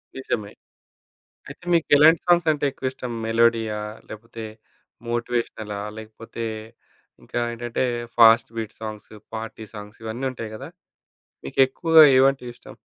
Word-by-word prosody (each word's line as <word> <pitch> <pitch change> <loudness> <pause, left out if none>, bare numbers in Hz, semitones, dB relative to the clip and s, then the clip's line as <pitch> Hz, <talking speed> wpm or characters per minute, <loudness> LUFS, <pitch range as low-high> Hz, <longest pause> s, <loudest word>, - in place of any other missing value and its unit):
నిజమే. 110 -6 -4 1.0
అయితే - - -12
మీకేలాంటి 160 -1 +5
సాంగ్సంటే 165 -4 +3
ఎక్కువిష్టం? 130 -2 -5
మెలోడియా 115 -1 +2 0.3
లేపోతే 115 +1 -9 0.6
మోటివేషనలా 120 -3 -3 0.2
లేకపోతే 110 +1 -8 0.8
ఇంకా - - -5
ఏంటంటే 120 +1 -3 0.3
ఫాస్ట్‌బీట్ 115 -1 +4
సాంగ్స్, 110 -1 -8 0.2
పార్టీ 110 0 -6
సాంగ్స్ 105 +1 -10
ఇవన్ని 115 +4 -4
ఉంటాయి 115 -4 -7
గదా! 135 +6 -8 0.8
మీకు 70 - -9
ఎక్కువగా 160 +4 +5
ఏవంటే 135 0 +3
ఇష్టం? - - -14
115 Hz, 100 wpm, -23 LUFS, 110-135 Hz, 1.0 s, మీకేలాంటి